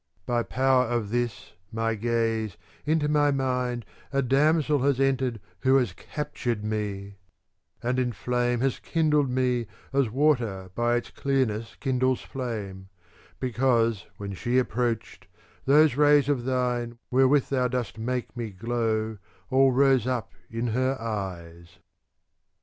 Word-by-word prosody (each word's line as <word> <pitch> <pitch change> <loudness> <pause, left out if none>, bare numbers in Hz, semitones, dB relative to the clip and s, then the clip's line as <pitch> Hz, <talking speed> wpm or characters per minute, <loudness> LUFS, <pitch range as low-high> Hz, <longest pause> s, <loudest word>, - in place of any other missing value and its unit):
* 90 - -41
By 120 -1 +1
power 130 +1 +2
of 115 -3 -2
this 120 -2 -2 0.2
my 115 0 0
gaze, 115 -2 -1 0.3
into 155 -1 +2
my 150 -1 +3
mind 125 -4 -1 0.3
A 140 -1 +1
damsel 150 +3 +3
has 135 0 +1
entered 130 -4 +1 0.2
who 130 +4 +3
has 125 -3 +2
captured 120 -7 -4
me; 100 -2 -3 0.7
and 125 +2 0
in 125 -1 +1
flame 120 +1 -1
has 135 -1 0
kindled 150 -4 +1
me 125 -2 0 0.3
as 135 -4 +2
water 115 -8 +1
by 120 +3 +1
its 120 - -3
clearness 115 -5 -1
kindles 130 -1 +1
flame: 105 -7 -6 0.2
* - - -28
because, 120 -4 +1
when 100 -1 -5
she 120 +6 -1
approached, 120 -2 -1 0.4
those 150 0 +5
rays 145 -1 +5
of 130 -4 0
thine 125 -2 -1
wherewith 135 +2 +4
thou 130 -2 +1
dost 120 -3 -3
make 125 +2 -3
me 120 -2 -4
glow 110 +1 -2 0.3
all 135 0 +5
rose 130 -2 +3
up 125 -6 -2 0.2
in 115 +1 -3
her 130 +2 0
eyes. 90 -6 -6
125 Hz, 140 wpm, -26 LUFS, 115-135 Hz, 0.7 s, those